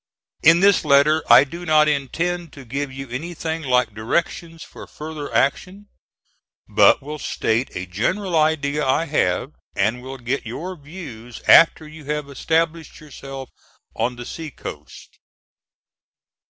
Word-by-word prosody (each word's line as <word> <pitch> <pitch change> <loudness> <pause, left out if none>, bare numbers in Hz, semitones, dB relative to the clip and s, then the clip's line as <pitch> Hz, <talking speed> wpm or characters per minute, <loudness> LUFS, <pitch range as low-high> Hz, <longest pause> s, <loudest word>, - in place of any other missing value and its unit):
In 165 +2 +6
this 200 0 +4
letter 150 +2 +4
I - - +9
do 170 +5 -8
not 155 -2 +4
intend 165 +4 -2
to 135 -2 -12
give 140 +3 -4
you 135 +1 -7
anything 160 +4 -4
like 125 -5 +1
directions 165 +8 -3
for - - -12
future 155 -1 -7
action, 195 +8 -1 0.8
but - - +4
will 150 +2 -7
state 115 0 -1
a 90 - -4
general 170 - -2
idea 150 -2 +1
I 135 +4 +1
have, 135 - 0 0.2
and 110 +5 0
will 130 +1 -8
get 125 +2 -3
your 170 +11 -6
views 140 -8 -10
after 160 -1 +6
you 155 -1 -12
have 150 0 -3
established 165 +3 -1
yourself 135 -3 -9 0.5
on 120 +2 -1
the 120 0 -8
sea 160 +3 -7
coast. - - -11
150 Hz, 140 wpm, -21 LUFS, 130-165 Hz, 0.8 s, I